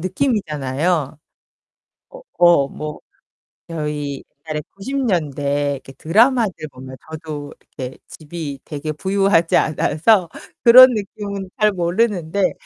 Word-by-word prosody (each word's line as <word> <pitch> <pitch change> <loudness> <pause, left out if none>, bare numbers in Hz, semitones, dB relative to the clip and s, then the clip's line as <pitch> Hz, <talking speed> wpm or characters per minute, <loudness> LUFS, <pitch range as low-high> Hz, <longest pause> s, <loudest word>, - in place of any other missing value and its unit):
느낌이잖아요. 160 - -1 0.9
어, - - -12 0.2
어 175 -5 +5
뭐 150 0 -7 0.7
저희 150 -3 -4 0.3
옛날에 155 -1 -2 0.2
90 260 +8 -5
년대 145 - 0
이렇게 135 0 -11
드라마를 225 - +3 0.2
보면 130 +1 -10
저도 150 -2 -7 0.2
이렇게 130 -1 -5
집이 150 -3 -7
되게 155 0 -5
부유하지 190 0 +2
않아서 165 +5 +2 0.4
그런 255 +2 +10
느낌은 200 -2 -5
잘 210 0 +4
모르는데 185 0 0
165 Hz, 240 characters per minute, -20 LUFS, 145-200 Hz, 0.9 s, 그런